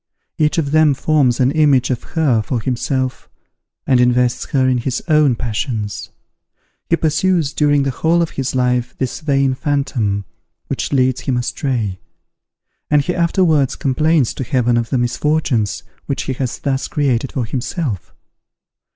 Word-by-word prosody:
Each 155 +3 +2
of 145 -4 0
them 155 -2 +4
forms 135 -4 +2
an 130 +1 +3
image 145 -5 +3
of 125 - -2 0.2
her 135 -9 +3
for 120 +3 -2
himself, 130 +2 -2 0.6
and 130 -2 +3
invests 125 0 +2
her 130 -2 +1
with 130 -1 +2
his 130 +1 -3
own 150 -5 +4
passions. 110 -2 -3 0.8
He 170 - +4
pursues 160 -1 +1
during 145 -2 +2
the 135 - 0
whole 165 +6 +1
of 165 - -4
his 135 -1 -3
life 125 -1 0
this 130 -2 -3
vain 140 -4 +1
phantom, 130 -8 -1 0.4
which - - -3
leads 130 -2 +2
him 130 -2 -1
astray; 120 -6 -2 0.9
and 150 -1 +3
he 180 - -1
afterwards 170 -5 +2
complains 150 0 +1
to - - -4
Heaven 125 -2 +1
of 115 -1 0
the 130 - 0
misfortunes 120 -2 0 0.2
which 140 - -2
he 130 - -3
has 130 -2 -3
thus 135 -1 -2
created 135 -3 -1
for 125 -4 -1
himself. 125 - -4
135 Hz, 150 wpm, -18 LUFS, 125-150 Hz, 0.9 s, them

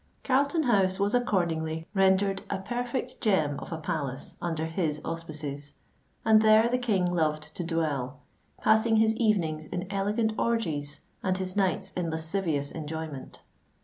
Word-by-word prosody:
Carlton 280 +5 +2
House 195 -6 +2
was 200 +1 +1
accordingly 165 -8 0
rendered 195 0 +3
a - - -1
perfect 245 +5 -4
gem 155 - +2
of - - -9
a 165 - -2
palace 145 -4 -4
under 165 -2 -1
his 160 -2 -1
auspices; 150 -3 -5 0.5
and 220 -1 +6
there 220 +1 +6
the 250 +1 +1
King 210 -7 +1
loved 155 -3 0
to 180 - -4
dwell, 150 -6 -1 0.4
passing 220 +1 +4
his 220 0 +4
evenings 165 -9 +1
in 180 0 -4
elegant 210 +3 0
orgies 155 -11 -1 0.2
and 185 -1 0
his 185 0 -3
nights 190 -4 +1
in 175 -2 -2
lascivious 160 -3 -1
enjoyment. 160 -3 -6
180 Hz, 145 wpm, -28 LUFS, 155-215 Hz, 0.5 s, and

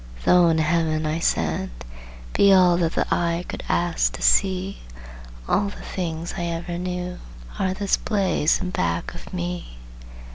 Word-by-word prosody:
"Though 180 -1 +6
in 165 -1 +3
Heaven," 155 0 +1
I 155 +2 -1
said, 80 - 0 0.6
"be 200 - +5
all 180 -2 +6
That 170 -2 0
the - - +1
eye 170 0 0
could - - -6
ask 175 -1 +1
to - - -6
see, 190 0 +2 0.7
All 200 0 +1
the - - -11
things 165 -2 -4
I 175 - -2
ever 170 +1 -4
knew 180 0 -4 0.4
Are 185 -1 0
this 200 0 +1
blaze 195 -7 +1
in 180 - -3
back 85 - -1
of - - -11
me." 85 -9 -5
170 Hz, 155 wpm, -23 LUFS, 160-185 Hz, 0.7 s, Though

